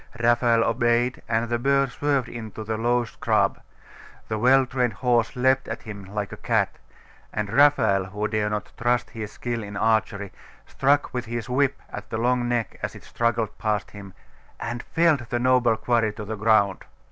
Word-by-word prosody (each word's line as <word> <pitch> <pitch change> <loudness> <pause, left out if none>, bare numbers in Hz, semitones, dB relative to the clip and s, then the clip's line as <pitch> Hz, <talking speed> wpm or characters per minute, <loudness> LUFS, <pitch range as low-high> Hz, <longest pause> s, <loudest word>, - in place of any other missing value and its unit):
Raphael 120 -1 +3
obeyed, 120 +2 +1
and 115 +1 +1
the 120 0 -1
bird 140 +1 +2
swerved 140 -2 0
into 110 -2 -7
the 110 +1 -3
low 120 +2 +1
scrub; - - 0 0.7
the 110 -1 -2
well 130 +3 +5
trained 125 -3 -1
horse 120 +2 +1
leapt 130 +1 +2
at 115 - -6
him 100 -3 -8
like 100 +1 -4
a - - -7
cat; - - 0 0.5
and 105 0 -3
Raphael, 140 -8 +4
who 105 +3 -3
dare 105 -1 0
not 105 -1 -4
trust 120 +1 +1
his 110 -3 -6
skill 120 0 -4
in 100 -1 -7
archery, 110 -3 0 0.3
struck 140 +1 +1
with 125 -1 -3
his 120 +1 -5
whip 140 +1 +1
at 105 - -8
the 110 - -3
long 120 +1 +1
neck 120 -3 -2
as - - -4
it - - -12
struggled 115 -1 -1
past 105 -2 -1
him, 100 -2 -11 0.4
and 120 0 -4
felled 155 -7 +1
the 120 - 0
noble 125 -2 +3
quarry 115 -1 +1
to 105 -1 -7
the 110 +1 -4
ground. 105 -3 +2
115 Hz, 180 wpm, -24 LUFS, 110-125 Hz, 0.7 s, well